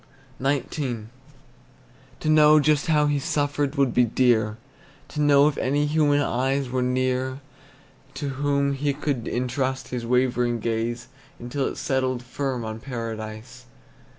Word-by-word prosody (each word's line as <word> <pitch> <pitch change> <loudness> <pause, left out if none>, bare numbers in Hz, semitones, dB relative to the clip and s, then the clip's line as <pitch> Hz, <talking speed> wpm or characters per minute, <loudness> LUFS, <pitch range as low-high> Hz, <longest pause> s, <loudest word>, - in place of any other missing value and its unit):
XIX. 140 +3 -1 1.4
To - - -3
know 155 0 +6
just 150 0 +2
how 150 -2 +3
he 145 -1 +1
suffered 145 0 -1
would 140 -3 +2
be 125 - +4
dear; 110 -2 +2 0.5
To 150 - -3
know 145 -1 +5
if 150 - -1
any 145 +3 +1
human 145 -1 +2
eyes 135 +1 -1
were 130 0 0
near 130 +1 0 0.8
To 140 +1 -3
whom 140 +1 0
he 140 0 -1
could 135 -6 -2
intrust 130 +2 -2
his 125 -2 -4
wavering 120 -1 +1
gaze, 115 +1 -2 0.3
Until 125 +3 -3
it - - -4
settled 130 -2 -1
firm 125 -1 -3
on 110 0 -5
Paradise. 115 0 -7
130 Hz, 135 wpm, -24 LUFS, 120-145 Hz, 1.4 s, know